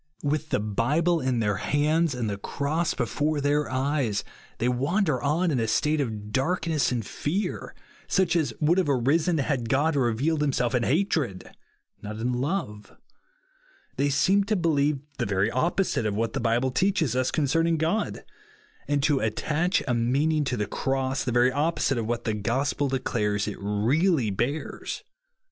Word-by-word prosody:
" -, -, -25 dB
With 150 Hz, +1 st, -1 dB
the -, -, +1 dB
Bible 145 Hz, -, +1 dB
in 130 Hz, -3 st, 0 dB
their 105 Hz, -2 st, 0 dB
hands, 150 Hz, -, +1 dB
and 120 Hz, -3 st, -2 dB
the 100 Hz, -1 st, -3 dB
cross 150 Hz, +9 st, -1 dB
before 145 Hz, +5 st, -1 dB
their 145 Hz, +1 st, +1 dB
eyes, 130 Hz, -5 st, 0 dB, 0.3 s
they 120 Hz, -, 0 dB
wander 140 Hz, -, +1 dB
on 160 Hz, +5 st, +1 dB
in 130 Hz, -, +1 dB
a 115 Hz, -, 0 dB
state 150 Hz, +6 st, +1 dB
of 105 Hz, -5 st, -4 dB
darkness 160 Hz, +3 st, 0 dB
and 120 Hz, -4 st, -2 dB
fear, 185 Hz, -, -3 dB, 0.3 s
such 190 Hz, -3 st, +2 dB
as 155 Hz, -7 st, +1 dB
would 165 Hz, +4 st, +3 dB
have 180 Hz, -, 0 dB
arisen 150 Hz, +6 st, +2 dB
had 135 Hz, -5 st, -1 dB
God 145 Hz, +5 st, +2 dB
revealed 135 Hz, +5 st, +1 dB
himself 135 Hz, -4 st, 0 dB
in 125 Hz, -, +2 dB
hatred, 140 Hz, -, 0 dB, 0.5 s
not 105 Hz, +1 st, -6 dB
in 120 Hz, +3 st, -1 dB
love. 125 Hz, -, -3 dB, 1.0 s
They 145 Hz, -, +2 dB
seem 185 Hz, +9 st, +3 dB
to 215 Hz, +1 st, 0 dB
believe 150 Hz, -5 st, +1 dB, 0.2 s
the -, -, 0 dB
very 100 Hz, +2 st, +1 dB
opposite 165 Hz, -, 0 dB
of 105 Hz, -, -2 dB
what 115 Hz, +4 st, -1 dB
the 135 Hz, -, -1 dB
Bible 120 Hz, +2 st, +1 dB
teaches 165 Hz, -, +1 dB
us 130 Hz, 0 st, +1 dB
concerning 165 Hz, +3 st, +1 dB
God; 165 Hz, +7 st, -1 dB, 0.6 s
and 145 Hz, -1 st, 0 dB
to 145 Hz, -2 st, +3 dB
attach 150 Hz, -, 0 dB
a 125 Hz, -, +1 dB
meaning 140 Hz, +7 st, +1 dB
to 125 Hz, -2 st, -1 dB
the 105 Hz, -, 0 dB
Cross, 135 Hz, +3 st, -1 dB
the 125 Hz, -, -1 dB
very 120 Hz, +1 st, +4 dB
opposite 145 Hz, -3 st, 0 dB
of 110 Hz, -, -3 dB
what 120 Hz, 0 st, -2 dB
the 110 Hz, -, -1 dB
gospel 130 Hz, +7 st, 0 dB
declares 105 Hz, -6 st, -1 dB
it 105 Hz, -, -5 dB
really 115 Hz, -, +1 dB
bears. 125 Hz, +10 st, -3 dB
140 Hz, 165 wpm, -26 LUFS, 120-155 Hz, 1.0 s, very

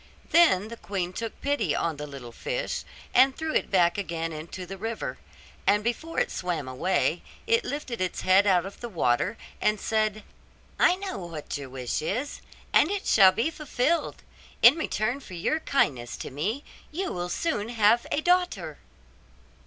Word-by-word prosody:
Then 220 Hz, -, +5 dB
the 235 Hz, -, -8 dB
queen 185 Hz, -4 st, -3 dB
took 225 Hz, +3 st, -5 dB
pity 255 Hz, -, 0 dB
on 165 Hz, -3 st, -1 dB
the 150 Hz, +1 st, -6 dB
little 135 Hz, -4 st, -9 dB
fish, -, -, -3 dB, 0.3 s
and 265 Hz, +1 st, +5 dB
threw 320 Hz, -1 st, -2 dB
it -, -, +1 dB
back 180 Hz, 0 st, +3 dB
again 165 Hz, -3 st, -3 dB
into 165 Hz, +4 st, -7 dB
the 195 Hz, -, -7 dB
river; 225 Hz, +3 st, -4 dB, 0.5 s
and 205 Hz, +1 st, +4 dB
before 240 Hz, +8 st, -2 dB
it -, -, 0 dB
swam 175 Hz, -6 st, -3 dB
away 165 Hz, +5 st, 0 dB, 0.2 s
it 460 Hz, +1 st, +3 dB
lifted 260 Hz, -7 st, -4 dB
its 185 Hz, -1 st, -2 dB
head 190 Hz, +2 st, +5 dB
out 180 Hz, -2 st, +4 dB
of 195 Hz, -, -9 dB
the 240 Hz, -, -6 dB
water 175 Hz, -, +1 dB, 0.2 s
and 210 Hz, -1 st, +2 dB
said, 215 Hz, -1 st, 0 dB, 0.6 s
'I 360 Hz, -, +5 dB
know 385 Hz, -, -5 dB
what 165 Hz, -5 st, -6 dB
your 140 Hz, -2 st, -6 dB
wish 125 Hz, -3 st, -3 dB
is, 240 Hz, -, -3 dB, 0.3 s
and 310 Hz, -, +5 dB
it 405 Hz, 0 st, -2 dB
shall 195 Hz, -3 st, +7 dB
be 230 Hz, +11 st, 0 dB
fulfilled, 300 Hz, +1 st, -1 dB, 0.4 s
in 240 Hz, -, +10 dB
return 245 Hz, -5 st, -1 dB
for 190 Hz, -9 st, -10 dB
your 185 Hz, -, 0 dB
kindness 135 Hz, -, 0 dB
to -, -, -7 dB
me 205 Hz, -, -2 dB, 0.3 s
you 375 Hz, +5 st, -3 dB
will 175 Hz, 0 st, -3 dB
soon 220 Hz, -, -1 dB
have 230 Hz, 0 st, +3 dB
a 300 Hz, -, +1 dB
daughter. 360 Hz, +1 st, +1 dB
210 Hz, 170 wpm, -27 LUFS, 175-280 Hz, 0.6 s, in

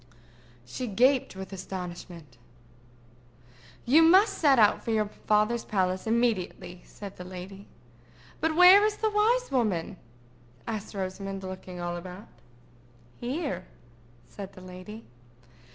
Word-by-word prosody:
She 245 Hz, -, -5 dB
gasped 250 Hz, +3 st, +2 dB
with 190 Hz, 0 st, -8 dB
astonishment. 180 Hz, -6 st, -8 dB, 1.5 s
"You 285 Hz, +7 st, +6 dB
must 385 Hz, +5 st, +5 dB
set 280 Hz, -4 st, +5 dB
out 210 Hz, -2 st, +4 dB
for -, -, -5 dB
your 215 Hz, -1 st, +2 dB, 0.2 s
father's 215 Hz, +2 st, +2 dB
palace 185 Hz, 0 st, -1 dB
immediately," 195 Hz, -6 st, -1 dB
said 200 Hz, -2 st, -10 dB
the 180 Hz, -, -7 dB
lady. 185 Hz, +2 st, -9 dB, 0.7 s
"But 320 Hz, 0 st, 0 dB
where 365 Hz, +4 st, +8 dB
is 425 Hz, 0 st, +1 dB
the 435 Hz, -1 st, 0 dB
wise 460 Hz, +4 st, +2 dB
woman?" 215 Hz, -11 st, -1 dB, 0.7 s
asked 215 Hz, -2 st, -5 dB
Rosamond, 195 Hz, 0 st, -5 dB
looking 185 Hz, -1 st, -8 dB
all 175 Hz, 0 st, -3 dB
about. 180 Hz, +3 st, -10 dB, 0.9 s
"Here," 250 Hz, -, -3 dB, 0.6 s
said 195 Hz, -2 st, -9 dB
the 185 Hz, -, -13 dB
lady. 185 Hz, +4 st, -10 dB
205 Hz, 120 wpm, -28 LUFS, 185-255 Hz, 1.5 s, where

